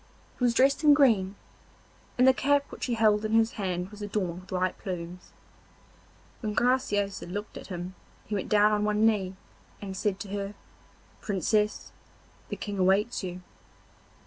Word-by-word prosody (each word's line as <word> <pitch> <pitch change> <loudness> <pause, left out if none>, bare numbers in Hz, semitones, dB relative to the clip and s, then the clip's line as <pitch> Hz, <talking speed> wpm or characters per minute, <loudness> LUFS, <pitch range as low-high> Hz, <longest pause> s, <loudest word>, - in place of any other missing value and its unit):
He - - -2
was 240 -1 +3
dressed 275 +5 +3
in 295 -1 +7
green, 215 -9 +3 0.8
and 250 +1 +5
the 265 - +7
cap 280 +2 +2
which - - -5
he 240 - 0
held 215 -1 +3
in 215 0 -2
his 225 0 +4
hand 185 -2 -3
was 210 0 -11
adorned 190 -4 -3
with 185 - -17
white 185 0 0
plumes. 180 -2 -6 1.1
When 210 -3 -3
Graciosa 205 -7 +1
looked 205 +4 -6
at - - -9
him 180 -1 -6 0.3
he 215 - -6
went 200 - -2
down 210 0 +5
on 210 0 +1
one 210 +1 +2
knee, 195 -4 +1 0.4
and 195 -2 -6
said 195 0 -1
to 205 - -6
her: 200 0 -4 0.7
'Princess, 210 +1 0 0.6
the - - -3
King 205 -2 -5
awaits 195 +6 +2
you. 180 0 -6
205 Hz, 165 wpm, -28 LUFS, 190-225 Hz, 1.1 s, in